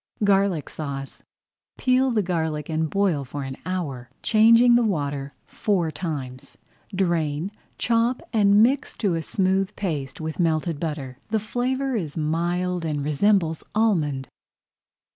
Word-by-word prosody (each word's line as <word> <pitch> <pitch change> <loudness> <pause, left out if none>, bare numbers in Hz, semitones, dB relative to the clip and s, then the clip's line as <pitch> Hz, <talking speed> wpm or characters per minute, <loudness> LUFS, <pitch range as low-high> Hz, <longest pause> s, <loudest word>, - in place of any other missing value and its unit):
GARLIC 195 -5 +2
SAUCE 140 -3 -6 0.6
Peel 255 +1 +3
the 220 -4 +1
garlic 160 -4 -2
and 160 0 0
boil 190 -7 +1
for 140 +2 -6
an 135 0 -5
hour, 140 -10 -3
changing 230 +2 +6
the 240 - +5
water 145 -8 -2
four 180 -6 0
times. 135 -8 -6 0.4
Drain, 170 -2 0 0.3
chop, 235 +1 +1
and 205 -1 +5
mix 265 +5 +1
to 200 -5 +1
a 165 - -1
smooth 190 +3 0
paste 145 -9 -3
with 160 +1 -5
melted 160 -2 +1
butter. 145 -6 -4
The 220 0 +1
flavour 255 +5 -1
is 165 -9 -3
mild 175 +3 -1
and 150 -3 -2
resembles 165 +1 +2
almond. 155 - +1
170 Hz, 130 wpm, -24 LUFS, 150-205 Hz, 0.6 s, changing